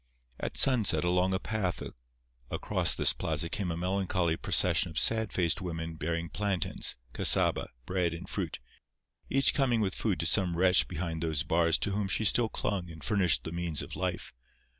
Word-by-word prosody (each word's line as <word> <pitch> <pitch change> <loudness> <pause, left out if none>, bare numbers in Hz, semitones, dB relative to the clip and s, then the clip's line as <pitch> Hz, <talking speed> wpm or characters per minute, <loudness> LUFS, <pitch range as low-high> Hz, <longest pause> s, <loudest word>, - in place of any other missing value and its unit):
At - - -4
sunset 125 -10 +4
along 90 +1 +1
a - - -1
path 105 -5 -3 0.7
across - - 0
this - - +2
plaza 80 +1 -1
came 95 0 -3
a 80 - -3
melancholy 90 -2 -1
procession 90 -1 +3
of 80 - -9
sad 110 -1 +2
faced 90 +1 0
women 80 -2 -5
bearing 85 +2 -3
plantains, 100 -1 0 0.2
cassaba, - - +2 0.2
bread 90 0 -1
and 85 +2 -8
fruit—each 90 - -3
coming 130 -5 +1
with 100 -3 0
food - - -2
to - - -2
some 90 -4 +2
wretch 90 +1 +4
behind 85 -2 -5
those 80 -2 -1
bars 80 +1 +2
to 100 - -1
whom 100 0 -2
she 110 +3 -1
still 115 +3 +4
clung 95 -6 -4
and 80 -1 -11
furnished 95 -5 +2
the 80 - -6
means 85 -2 -1
of - - -9
life. - - -4
90 Hz, 170 wpm, -29 LUFS, 85-100 Hz, 0.7 s, sunset